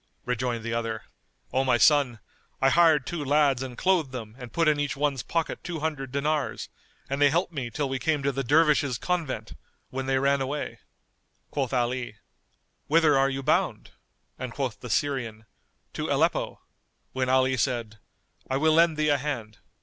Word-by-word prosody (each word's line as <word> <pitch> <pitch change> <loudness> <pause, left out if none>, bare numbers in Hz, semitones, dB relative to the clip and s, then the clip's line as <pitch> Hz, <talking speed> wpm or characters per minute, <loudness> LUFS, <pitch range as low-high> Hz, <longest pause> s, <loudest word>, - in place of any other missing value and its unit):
Rejoined 125 -1 -2
the 115 0 -3
other, 115 -1 -2 0.5
"O 130 - +2
my 125 -2 +3
son, 140 -2 +4 0.4
I 135 0 +4
hired 160 -4 +5
two 170 -4 -4
lads 140 -2 +3
and 130 -2 -6
clothed 180 -7 +2
them 115 -4 -7
and 125 -2 -9
put 165 +3 +1
in 150 -1 +3
each 145 -3 -1
one's 140 -3 0
pocket 165 -1 -2
two 170 -3 -5
hundred 145 -5 -3
dinars; 145 +1 -1 0.4
and 140 +1 -3
they 145 - +7
helped 170 +4 0
me 130 -6 -3
till 140 +5 -2
we 130 0 -2
came 150 +2 0
to 140 - +2
the 135 0 -2
Dervishes' 145 -2 +3
Convent,[FN#218] 170 -2 -3 0.3
when 130 0 -4
they 135 0 +2
ran 140 +1 +2
away." 140 +3 -4 0.7
Quoth 135 -3 -1
Ali, 125 -2 -1 0.7
"Whither 155 -1 +4
are 135 0 +3
you 135 0 -4
bound?" 155 - 0 0.5
and 130 -2 -4
quoth 125 -6 -3
the 125 - -8
Syrian, 115 -4 -1 0.5
"to - - -3
Aleppo," - - 0 0.5
when 130 -1 -1
Ali 130 0 +3
said, 115 -4 -2 0.5
"I 130 - +1
will 155 +2 +3
lend 165 -1 +4
thee 155 0 +2
a 145 -1 +3
hand." 120 -7 -4
135 Hz, 175 wpm, -26 LUFS, 125-150 Hz, 0.7 s, they